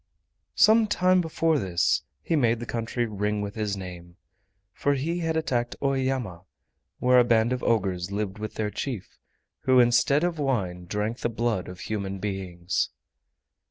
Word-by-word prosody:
Some 220 +1 +6
time 185 -2 +3
before 160 -2 +1
this 90 -3 +1 0.2
he 165 - 0
made 120 -5 +2
the 120 - -5
country 115 +1 -2
ring 105 -1 -2
with 100 0 -4
his 105 -2 -2
name, 90 -2 -9 0.6
for 145 +6 +1
he 165 +6 -2
had 165 -1 -1
attacked 120 -6 -1
Oeyama, 130 -9 -1 0.6
where 125 0 +5
a - - +6
band 115 0 +3
of 125 - -3
ogres 95 -5 0
lived 100 0 -3
with 110 0 -5
their 105 -1 -2
chief, 120 -6 -5 0.5
who 130 -1 +5
instead 125 +5 +4
of 175 -2 -1
wine 95 -11 -1
drank 105 +6 -2
the - - -1
blood 115 -4 -1
of 90 0 -9
human 100 0 -3
beings. 95 -3 -2
115 Hz, 160 wpm, -26 LUFS, 100-135 Hz, 0.6 s, Some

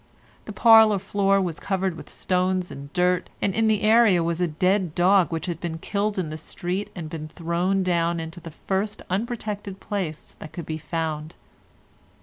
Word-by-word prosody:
The - - -6
parlour 220 -3 +6
floor 195 0 +1
was 175 -4 -2
covered 190 -2 -1
with - - -11
stones 185 0 -1
and 140 +1 -9
dirt, 180 0 +1
and 195 - 0
in 225 +2 +2
the 215 -1 +2
area 215 -5 +5
was 170 +1 -1
a 175 - +2
dead 180 +2 0
dog 185 0 +4
which 165 -1 -3
had 170 -3 -4
been 165 -2 -4
killed 205 +4 -2
in 170 -5 -2
the 155 - -6
street 180 +5 -4
and 170 -4 -5
been 155 -1 -6
thrown 175 +4 -1
down 170 -1 +1
into 165 +1 -7
the 165 - -9
first 195 +6 -3
unprotected 205 -2 -3
place 190 -7 -5
that 155 - -10
could 170 -4 -6
be 155 0 -4
found. 160 -1 -4
180 Hz, 180 wpm, -24 LUFS, 165-200 Hz, -, parlour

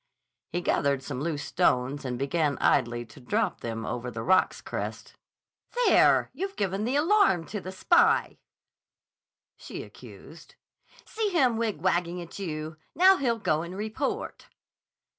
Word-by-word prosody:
He 175 - -2
gathered 140 -5 +1
some 130 - -5
loose 150 -2 -2
stones 140 -5 0
and 125 -1 -3
began 140 +2 0
idly 120 -2 +1
to 110 +4 -16
drop 125 - -1
them 115 -1 -4
over 125 0 -4
the 110 -2 -6
rock's 185 +1 +3
crest. - - -6 0.7
"There! - - +4
You've 390 +8 -4
given 200 +1 -1
the 250 +4 -1
alarm 315 - +3
to 210 - -5
the 185 - -7
spy," 340 - +3 1.2
she - - -8
accused. - - -14 0.5
"See 435 -2 -2
him 265 -11 +2
wigwagging 180 -5 -1
at 170 +2 -9
you! 155 -4 -5 0.2
Now 375 +2 +6
he'll 240 -4 0
go 155 -7 0
and 175 +3 -7
report." 215 +1 -4
175 Hz, 140 wpm, -27 LUFS, 140-225 Hz, 1.2 s, Now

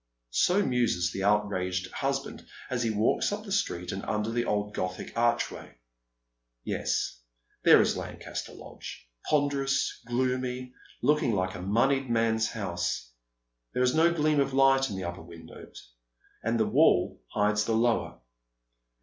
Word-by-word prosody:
So 195 +3 +3
muses 115 -9 +1
the 95 - -4
outraged 95 -3 0
husband 135 0 -3 0.2
as 125 -1 0
he 115 - +1
walks 110 - +1
up 210 +1 -4
the 205 - -9
street, 90 - -1
and 95 - -4
under 105 +1 -1
the 120 +1 0
old 105 0 -1
Gothic 90 0 -4
archway. 120 - 0 0.9
Yes, - - -2 0.4
there - - +8
is - - 0
Lancaster - - -6
Lodge - - -10 0.2
ponderous, 140 -1 +1
gloomy, 125 0 -1 0.3
looking 145 -2 +3
like 95 -1 -1
a 90 - -7
moneyed 130 +7 +1
man's 115 -1 +2
house. - - -3 0.6
There 125 - +1
is 125 - +3
no 165 +2 +4
gleam 155 -3 +2
of 135 -1 +1
light 135 0 +4
in 100 - -5
the 95 - -4
upper 85 +1 -5
windows, 80 -7 -13 0.5
and 115 +1 0
the 110 - +3
wall 105 - +3
hides 105 - +1
the 115 - +1
lower. 115 - 0
115 Hz, 145 wpm, -28 LUFS, 95-135 Hz, 0.9 s, there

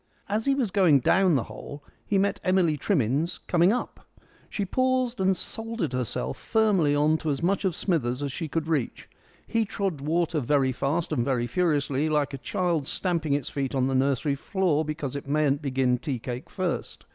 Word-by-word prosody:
As 215 +2 -1
he 275 - +4
was 245 -8 -1
going 180 -8 +5
down 185 +5 +3
the 130 - +1
hole 145 +1 -9 0.2
he 200 - 0
met 200 +1 +1
Emily 185 -4 +3
Trimmins 145 - 0
coming 175 +2 +4
up. 250 - -4 0.4
She 200 - -2
paused 255 +2 0
and 190 -1 +2
soldered 225 - -4
herself 110 - -3
firmly 200 -10 +2
on 155 +2 +3
to 155 - -3
as 145 +2 -2
much 195 +3 +1
of 185 -4 +1
Smithers 140 - 0
as 140 - -2
she 160 +3 -4
could 160 +1 -2
reach. 150 -7 -2 0.4
He 230 -1 +1
trod 195 -7 -3
water 160 +2 0
very 135 0 +2
fast 145 +7 -1
and 130 -6 +1
very 125 -2 0
furiously, 145 -1 0
like 150 -2 0
a 135 - -5
child 165 +2 -1
stamping 165 -5 -1
its 140 -3 -1
feet 135 -1 -2
on 130 -1 +2
the 135 - 0
nursery 135 +2 +1
floor 160 +1 0
because 150 -3 -4
it 140 - -6
mayn't 145 0 +1
begin 130 -3 +1
tea 140 -3 -3
cake 120 +1 -6
first. - - -4
155 Hz, 190 wpm, -26 LUFS, 135-185 Hz, 0.4 s, going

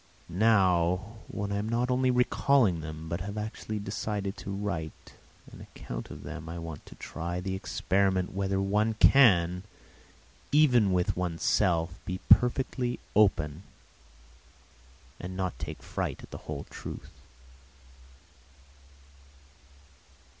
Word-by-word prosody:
Now, 95 -1 +3
when 100 0 -4
I 100 - 0
am 105 +2 -2
not 120 +2 0
only 130 0 +2
recalling 125 -6 +3
them, 80 +1 -7
but 85 +2 -3
have 100 +3 -5
actually 110 0 -4
decided 100 -1 -3
to - - -8
write 95 -6 -4 0.4
an - - -12
account - - -8
of - - -9
them, 80 +2 -7
I 85 - -5
want 80 -3 -8
to - - -12
try 85 +1 -5
the 95 +1 -3
experiment 95 0 0
whether 95 0 0
one 105 +3 +1
can, 90 -9 +5 0.9
even 125 -9 +5
with 90 -1 +1
oneself, 85 0 +1
be 95 0 -3
perfectly 125 0 +3 0.2
open 80 -7 +3 1.6
and 95 +1 -6
not 95 -2 -2
take 80 0 -6
fright - - -4
at - - -12
the - - -7
whole 70 -2 -4
truth. - - -8
95 Hz, 120 wpm, -29 LUFS, 85-110 Hz, 1.6 s, can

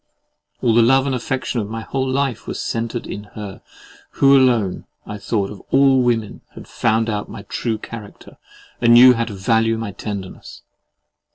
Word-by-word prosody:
All 115 - +3
the 120 - +5
love 135 +3 +4
and 135 - -1
affection 130 0 -2
of 105 -2 -4
my 115 0 -5
whole 130 +3 -3
life 135 -2 -2
were - - -4
centred 115 +1 -3
in 105 - -7
her, 105 -3 -8 0.5
who 140 0 +5
alone, 120 -8 +2 0.2
I 105 - -7
thought, 100 -1 -2
of 105 - -10
all 135 -1 +4
women 115 -4 -1
had - - -11
found 115 -1 0
out 105 -2 -3
my 100 - -9
true 110 +2 -3
character, 105 -1 -11 0.4
and 120 0 +6
knew 125 +1 +9
how 115 -1 -1
to 110 -3 -7
value 115 +3 +1
my 110 -2 -5
tenderness. 100 -1 -8
115 Hz, 175 wpm, -20 LUFS, 105-125 Hz, 0.5 s, knew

